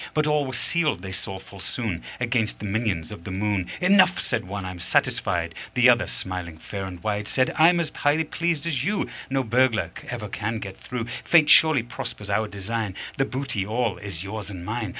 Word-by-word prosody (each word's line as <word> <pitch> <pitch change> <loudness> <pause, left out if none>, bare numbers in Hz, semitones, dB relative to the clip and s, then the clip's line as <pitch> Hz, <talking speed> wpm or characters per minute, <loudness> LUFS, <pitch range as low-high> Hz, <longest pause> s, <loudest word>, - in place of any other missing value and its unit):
But 155 -1 +3
all 150 -2 +2
were 130 - -5
sealed, 155 - 0
they 95 - -5
saw 95 0 -4
full 95 +1 -13
soon, 95 -2 -3 0.2
Against 120 -3 0
the - - -7
minions 100 -5 -1
of 105 - -9
the - - -7
moon. 95 -1 0
"Enough," 185 0 +5
said - - -1
one: 100 +1 -5
"I'm 90 -1 -6
satisfied." - - +1 0.2
The 125 0 +7
other, 120 -3 +4
smiling 90 -3 -4
fair 100 +4 -5
and 90 -2 -8
wide, 105 -1 -1
Said: 130 -1 +1
"I'm 170 +3 +6
as 160 -2 -1
highly 145 +2 +2
pleased 170 -1 -1
as 145 -7 0
you: 205 +5 0 0.2
No 135 0 +1
burglar 125 -1 +2 0.2
ever 115 -4 -4
can 110 +3 -3
get 100 -3 -6
through. 125 -2 -4 0.2
Fate 155 -4 +5
surely 150 -4 +7
prospers 105 -3 -5
our 110 +2 +1
design 105 0 -3 0.2
The 135 - +2
booty 130 -7 -2
all 110 +1 -1
is 95 -4 -5
yours 105 0 -5
and 90 -3 -7
mine." 110 +1 -2
110 Hz, 200 wpm, -25 LUFS, 100-135 Hz, 0.2 s, The